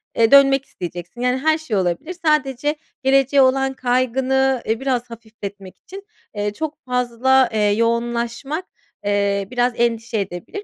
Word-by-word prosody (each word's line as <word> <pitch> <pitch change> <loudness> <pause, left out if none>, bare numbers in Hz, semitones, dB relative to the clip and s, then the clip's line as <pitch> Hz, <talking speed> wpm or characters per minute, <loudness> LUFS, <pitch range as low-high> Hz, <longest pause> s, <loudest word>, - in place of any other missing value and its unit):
eee, 225 -1 +3
dönmek 275 -1 +6
isteyeceksin, 175 +4 -8
yani, 250 +1 +1
her 310 +4 +2
şey 315 -10 -3
olabilir. 190 - -2
Sadece 295 -1 +1 0.3
geleceğe 270 +1 +4
olan 270 +1 +2
kaygını, 260 +1 +1
eee, 225 +1 -1
biraz 250 -3 -1
hafifletmek 210 -4 -10
için, 390 +1 -11 0.3
eee, 205 0 -2
çok 310 +6 -5
fazla, 250 +1 +2
eee, 215 - +1
yoğunlaşmak, 235 - -1 0.4
eee, 200 -1 0
biraz 245 0 +1
endişe 230 -1 0
edebilir. 195 - -6
245 Hz, 135 wpm, -20 LUFS, 220-270 Hz, 0.4 s, dönmek